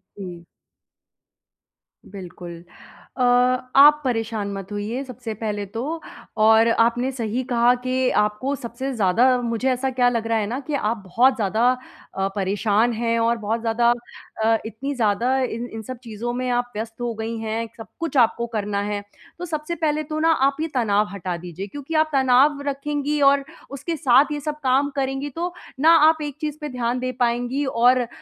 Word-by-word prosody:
जी। 175 -4 -8 1.6
बिल्कुल। 175 -3 -10 0.5
अ, 255 - -2 0.5
आप 295 +2 +8
परेशान 225 -5 -2
मत 195 0 -7
होइए 215 +6 -3
सबसे 245 -4 -7
पहले 210 -1 -3
तो, 255 +11 -5 0.4
और 220 +1 +5
आपने 240 +3 +2
सही 235 0 -3
कहा 245 -1 +3
कि 255 0 +1
आपको 210 +6 -1
सबसे 250 +2 -5
ज़्यादा 215 +1 +3 0.2
मुझे 235 +2 -1
ऐसा 255 +1 -1
क्या 250 -1 +3
लग 230 -2 -2
रहा 225 0 +1
है 205 -2 -1
ना, 250 +5 -3
कि 290 +2 -6
आप 230 -4 0
बहुत 245 +8 +3
ज़्यादा 220 +2 +2 0.5
अ, 195 - +1
परेशान 205 +4 +1
हैं 230 +1 0
और 230 +1 +2
बहुत 225 +1 -2
ज़्यादा 235 +1 +2 0.6
अ, 225 0 +4
इतनी 255 +6 -4
ज़्यादा 235 +3 +1
इन 245 -2 -2
इन 225 - -5
सब 255 +3 -7
चीज़ों 235 +1 -5
में 255 0 -2
आप 245 0 -1
व्यस्त 225 +2 -6
हो 240 -1 -2
गई 225 +1 -4
हैं, 225 +1 -3
सब 225 - -9
कुछ 330 -4 -2
आपको 235 -1 +3
करना 205 -2 -2
है। 205 0 -3 0.4
तो 355 - -4
सबसे 310 0 -4
पहले 310 -1 0
तो 310 +1 -4
ना, 325 +1 +3
आप 275 -3 +2
ये 320 - 0
तनाव 210 -4 +2
हटा 185 -2 -4
दीजिए, 180 +3 -7
क्योंकि 285 +8 -8
आप 310 0 +3
तनाव 270 +2 +4
रखेंगी 290 +1 -2
और 280 0 +4 0.3
उसके 325 +4 -4
साथ 265 -2 +5
ये 295 - -2
सब 300 +1 -4
काम 270 +2 +2
करेंगी 270 +1 -2
तो, 345 +5 -4 0.3
ना 310 +4 +5 0.2
आप 315 -1 0
एक 290 -1 -5
चीज़ 305 -1 -3
पे 300 - -4
ध्यान 250 -1 -2
दे 255 0 -2
पाएँगी 245 +3 0
और 250 0 +3
अ, 240 - -3
240 Hz, 180 wpm, -22 LUFS, 220-275 Hz, 1.6 s, आप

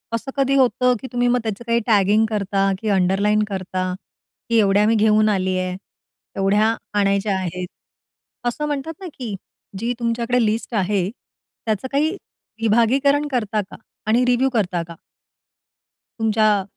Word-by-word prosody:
असं 250 +4 -5
कधी 275 0 +2
होतं? 250 -1 +3
की 260 - -6
तुम्ही 245 0 +1
मग 245 0 +3
त्याचं 220 0 -4
काही 235 0 +2
टॅगिंग 210 0 +4
करता, 195 -2 0
की 220 - -2
अंडरलाइन 200 +2 +2
करता, 185 -1 -3 0.6
की 230 - +3
एवढ्या 205 0 +4
मी 225 - +3
घेऊन 215 0 +4
आली 190 -2 0
आहे, 185 0 -2 0.6
एवढ्या 205 +3 +2 0.2
आणायच्या 200 0 +1
आहेत. 180 -1 -4 0.8
असं 270 +5 -2
म्हणतात 295 +2 -3
ना, 375 - -6
की 230 -6 -5 0.4
जी 235 +3 -1
तुमच्याकडे 235 +1 +1
लिस्ट 220 +3 -2
आहे 195 -2 +1
त्याचं 220 -2 -7
काही 290 +3 +2 0.5
विभागीकरण 265 +7 +3
करता 215 -4 0
का? - - -9 0.3
आणि 235 +3 +3
रिव्ह्यू 250 +2 +2
करता 185 -6 0
का? 170 - -10 1.2
तुमच्या 215 -2 +2
215 Hz, 145 wpm, -21 LUFS, 195-245 Hz, 1.2 s, टॅगिंग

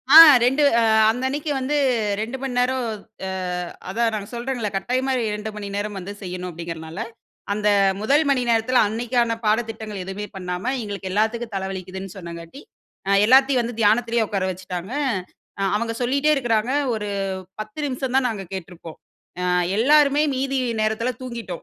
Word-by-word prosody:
ஆ. - - +13 0.3
2 270 +4 +3 0.2
அ, - - +3 0.3
அந்த 250 +3 -4
அன்னைக்கு 290 +3 -2
வந்து, 275 +3 0 0.4
2 235 +5 -4
மணி 270 -2 -3
நேரம் 255 0 +1 0.4
அ, - - -3 0.6
அதான் 230 +3 +1
நான் 205 0 -5
சொல்றேன்ல 240 -2 -3
கட்டாயமா 255 +6 0
இரு 245 - 0
2:00 210 +1 -4
மணி 205 -1 -6
நேரம் 205 0 -3
வந்து 190 +2 -7
செய்யணும். 180 -1 -5
அப்டீங்றனால, 165 +1 -7 0.5
அந்த 210 0 +1 0.3
1:00 285 +8 +3
மணி 270 -2 +3
நேரத்துல 230 +2 +3
அன்னைக்கான 235 +1 0
பாடத்திட்டங்கள் 220 -2 -1
எதுமே 195 +2 -5
பண்ணாம, 180 -1 -4 0.2
எங்களுக்கு 200 -2 -5
எல்லாத்துக்கும் 220 +2 -1
தல 190 0 -2
வலிக்குதுன்னு 190 +1 -7
சொன்னாங்காட்டி 170 - -9 0.5
அ, - - 0 0.2
எல்லாத்தையும் 265 +2 +5
வந்து 235 -1 -5
தியானத்திலயே 230 +2 +3
உட்கார 195 -2 -1
வச்சுட்டாங்க. 185 +4 -6 0.8
அவங்க 230 +2 -1
சொல்லிட்டே 280 +5 +2
இருக்குறாங்க. 240 -3 0 0.2
ஒரு. 210 -1 -3 0.5
10 215 +5 -8
நிமிஷம் 260 -1 -3
தான் 265 -1 +3
நாங்க 210 -4 -4
கேட்டிருப்போம். 175 -3 -8 0.4
அ, - - -2 0.3
எல்லாருமே 290 +4 +4
மீதி 270 +1 -1 0.2
நேரத்துல 220 +3 0
தூங்கிட்டோம். 235 -8 -6
225 Hz, 150 wpm, -22 LUFS, 195-255 Hz, 0.8 s, ஆ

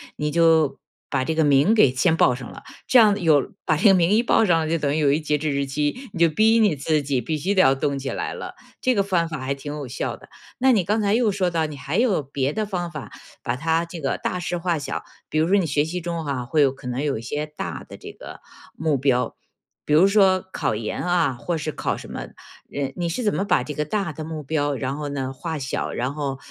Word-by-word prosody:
你 150 0 -2
就 160 -3 +3 0.3
把 130 -1 0
这 160 - -1
个 160 - +3
名 145 +9 +4
给 210 - +5
先 160 +6 +2
报 125 - +4
上 125 -1 -8
了， - - -12 0.2
这 255 - +6
样 210 -2 +5
有 155 -4 +3
把 155 - +1
这 210 - +4
个 195 - +7
名 175 -1 +3
一 220 +2 +4
报 225 -2 +3
上 165 -3 +3
了 155 - -2
就 165 - +1
等 145 -2 0
于 155 - 0
有 145 -2 +3
一 150 - +2
个 155 - -11
截 150 -1 +1
止 155 +1 -2
日 140 0 0
期， 150 - -2
你 180 - -7
就 170 - +6
逼 220 +7 +4
你 205 -8 +3
自 150 +2 0
己 135 -3 -1
必 155 +7 -2
须 195 +7 -1
得 185 - +6
要 135 - +5
动 140 +1 -1
起 135 0 -4
来 - - -3
了。 - - -7 0.3
这 255 - +2
个 200 - +2
方 170 -4 0
法 155 -3 -5
还 130 +1 -2
挺 145 +1 -7
有 145 -3 -6
效 125 - -4
的。 - - -17 0.3
那 260 0 +4
你 195 -5 +3
刚 210 +5 0
才 200 0 +2
又 225 -2 +3
说 190 -2 0
到 165 -2 0
你 150 -2 -7
还 140 +7 -3
有 225 -9 +2
别 140 0 -2
的 215 +3 -2
方 175 -4 -3
法 150 -4 -7 0.3
把 120 - -2
它 165 +5 0
这 170 -1 -8
个 135 - -1
大 180 - -2
事 175 0 -3
化 170 -1 0
小， 140 -2 -4 0.3
比 155 - 0
如 160 - +2
说 195 - +3
你 185 - +1
学 145 0 +1
习 175 +2 -4
中 170 -2 -4
哈， 135 -3 -2
会 150 +5 +1
有 135 -2 +4
可 135 -1 -11
能 125 +2 -2
有 145 -4 -1
一 110 - -6
些 145 +6 -3
大 150 0 -6
的 - - -10
这 - - -10
个 - - -11 0.4
目 155 -3 +1
标， 125 -3 0 0.5
比 150 - 0
如 175 +6 +6
说 195 -2 +4
考 110 - -1
研 105 0 -4
啊 175 -5 +2
或 165 +7 -3
是 155 0 -3
考 - - -2
什 - - -10
么， - - -5 0.5
嗯， 135 -2 -1
你 175 -1 -1
是 175 +9 -2
怎 210 - +1
么 195 - -1
把 150 -10 +2
这 150 - -6
个 150 +1 -2
大 195 +1 -2
的 155 +1 -7
目 160 -2 -6
标 145 -1 -1
然 135 +2 -3
后 150 -1 -4
呢 135 -2 -3
化 160 +4 -5
小？ 135 -1 -3
然 130 +3 -2
后， 140 -3 -3
155 Hz, 290 characters per minute, -23 LUFS, 140-180 Hz, 0.5 s, 个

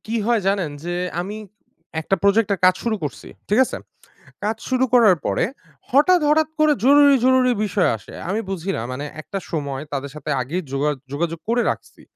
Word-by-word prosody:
কি 230 +2 -2
হয় 235 -2 +2
জানেন? 195 -6 +1
যে 175 0 -3 0.3
আমি 200 +4 -5 0.6
একটা 195 +5 0
প্রজেক্টে 200 +1 +3
এর - - -27
কাজ 185 0 +6
শুরু 225 -2 0
করছি। 145 - -5 0.2
ঠিক 210 +4 +2
আছে? - - -5 0.7
কাজ 215 +1 0
শুরু 260 0 +2
করার 215 -7 +6
পরে - - +1 0.5
হঠাৎ, 345 +7 +5
হঠাৎ 310 +1 +3
করে 305 -1 +5
জরুরি, 285 0 +7
জরুরি 255 -1 +4
বিষয় 200 -2 +1
আসে! 105 - -14
আমি 210 +4 0
বুঝি 190 0 -3
না - - -3
মানে 135 +3 -5 0.2
একটা 195 - -5
সময়, 140 -4 -3
তাদের 140 0 -3
সাথে 150 0 -6
আগেই 160 +9 -3
যোগা 140 +2 +1 0.2
যোগাযোগ 165 +2 -2
করে 240 +1 +2
রাখছি। - - -8
200 Hz, 185 wpm, -21 LUFS, 160-245 Hz, 0.7 s, জরুরি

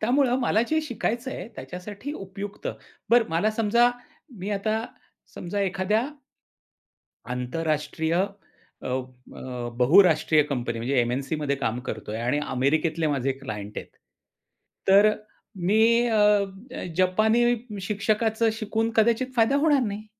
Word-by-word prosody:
त्यामुळं 250 +2 +2
मला 225 -2 +2
जे 315 0 +2
शिकायचं 240 -2 -3
आहे 180 - -6
त्याच्यासाठी 205 +10 -7
उपयुक्त. 200 - -7 0.4
बरं 235 -1 +5
मला 170 +7 +2
समजा 225 +2 +3 0.5
मी 195 +3 -4
आता 220 +2 -1 0.5
समजा 200 +3 -4
एखाद्या 195 +5 0 1.2
आंतरराष्ट्रीय 155 +5 -2
अ, 195 +2 -5
अ, 125 -1 -6
बहुराष्ट्रीय 160 0 +5
कंपनी 120 -4 -2
म्हणजे 125 +3 0
एम-एन-सीमध्ये 140 +4 -1
काम 120 -3 -2
करतोय 110 0 -5
आणि 125 +5 0 0.2
अमेरिकेतले 155 +5 +1
माझे 135 -2 0
क्लायंट 105 -6 -7
आहेत. - - -8 1.0
तर 200 +2 +7 0.6
मी 230 +4 +4
अ, 225 - +1 0.6
अ, - - -5
जपानी 215 +6 +3 0.4
शिक्षकाचं 220 +3 +1
शिकून 220 +1 -1
कदाचित 235 +3 +2
फायदा 230 +5 +4
होणार 290 -2 +3
नाही. 210 +1 -5
195 Hz, 115 wpm, -25 LUFS, 140-225 Hz, 1.2 s, तर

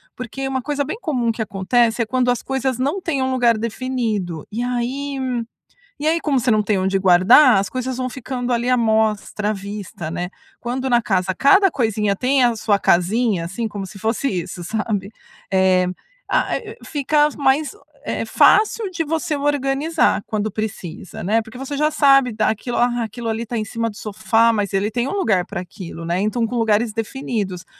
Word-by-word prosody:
Porque 255 +2 -6
uma 265 -1 -2
coisa 290 +2 -1
bem 305 +9 -5
comum 250 -9 0
que 225 - -5
acontece, 225 +4 +1
é - - +1
quando 250 +2 0
as 245 -2 0
coisas 265 -2 -1
não 280 +9 -1
têm 285 -7 -1
um 260 - 0
lugar 240 -3 +3
definido. 220 - -3
E 225 +3 -3
aí 255 +3 -2 0.8
e 300 - -2
aí, 330 +1 +2
como 285 -4 +1
você 245 +1 +1
não 215 -1 +3
tem 205 -1 0
onde 190 +1 +1
guardar, 195 +7 +6
as 195 - -1
coisas 255 0 -3
vão 255 0 -1
ficando 250 -1 -4
ali 240 +1 0
à 255 - +4
mostra, 220 -2 +1
à - - +1
vista, 200 -5 -6
né. 180 +1 -4 0.3
Quando 255 +2 -3
na 240 -1 +4
casa, 190 -3 0
cada 390 - +5
coisinha 215 -7 0
tem 260 +3 +2
a 240 -1 +3
sua 210 -2 +1
casinha, 195 +1 +2
assim, 195 +7 -3
como 200 -2 -6
se 200 +2 -11
fosse 225 +6 -1
isso, 180 -1 -4
sabe? 210 0 -2 0.4
Eh, 190 -1 +3 0.4
a - - +1
a - - -1 0.3
fica 295 0 +2
mais, 280 +2 +2 0.3
eh, - - -2
fácil 430 -1 +3
de 335 -3 -2
você 315 0 -1
organizar, 285 0 +1
quando 215 0 -2
precisa, 195 -4 -6
né. 215 +5 +2
Porque 220 +2 -13
você 270 +2 -5
já 300 +2 +2
sabe, 275 -4 +4
daquilo. 220 +2 -1
"Ah, 240 -1 +1
aquilo 230 +1 -6
ali 225 +1 -2
tá 235 - -4
em 215 - -1
cima 230 +2 -2
do 205 - -14
sofá." 225 +3 +2
Mas 205 -3 -1
ele 200 +2 +1
tem 240 +3 -1
lugar 235 - +1
pra 195 -4 -5
aquilo, 175 -2 -9
né? 170 +2 -1
Então 220 +3 0
com 245 +2 -4
lugares 225 0 +2
definidos. 215 -5 -3
230 Hz, 190 wpm, -20 LUFS, 205-265 Hz, 0.8 s, guardar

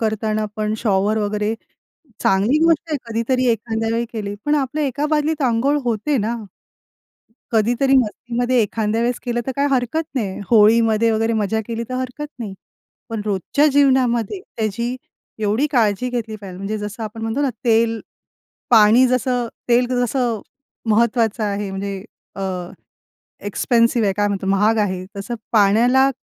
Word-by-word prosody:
करताना 215 -1 -1
पण 215 0 -1
शॉवर 210 -1 +1
वगैरे 210 +1 -1 0.7
चांगली 205 +10 +3
गोष्ट 330 0 +2
आहे 295 - +1
कधीतरी 250 +3 0
एखाद्यावेळी 225 +1 -1
केली. 205 -2 -4
पण 295 +1 +2
आपल्या 290 +2 -1
एका 280 +3 -1
बादलीत 305 0 0
अंघोळ 255 +4 +2
होते 240 +5 0
ना? 225 +2 -1 1.2
कधीतरी 240 +5 +2
मस्तीमध्ये 245 +2 -1
एखांद्या 215 +1 -1
वेळेस 245 +1 0
केलं 240 -1 -1
तर 265 - -1
काय 285 +1 +2
हरकत 260 +5 0
नाही. 205 -7 -2
होळीमध्ये 225 0 +5
वगैरे 225 +1 +1
मजा 220 +1 0
केली 230 0 -3
तर 255 - -4
हरकत 255 +3 -4
नाही. 215 -5 -5 0.6
पण 225 -2 -3
रोजच्या 210 - +1
जीवनामध्ये 260 - +2 0.2
त्याची 235 +3 -2 0.4
एवढी 220 +7 +1
काळजी 235 -2 +1
घेतली 225 -3 -3
पाहिजे 195 -3 -9
म्हणजे 210 +2 -3
जसं 210 +2 -6
आपण 220 +1 -6
म्हणतो 225 +5 -2
ना 275 - +1
तेल, 230 -1 +2 0.7
पाणी 225 +3 +6
जसं 250 -1 0 0.2
तेल 245 +1 +4
जसं 245 -3 0 0.5
महत्वाचं 225 0 +2
आहे 200 -1 -2
म्हणजे 195 0 -5 0.3
अ, 195 - -4 1.0
एक्सपेन्सिव्ह 230 +1 +2
आहे 195 - +2
काय 205 0 +2
म्हणतो, 195 -1 -3
महाग 210 +3 +2
आहे. 185 -3 -1
तसं 200 +5 -4 0.2
पाण्याला, 235 +6 +4
230 Hz, 145 wpm, -20 LUFS, 210-250 Hz, 1.2 s, पाणी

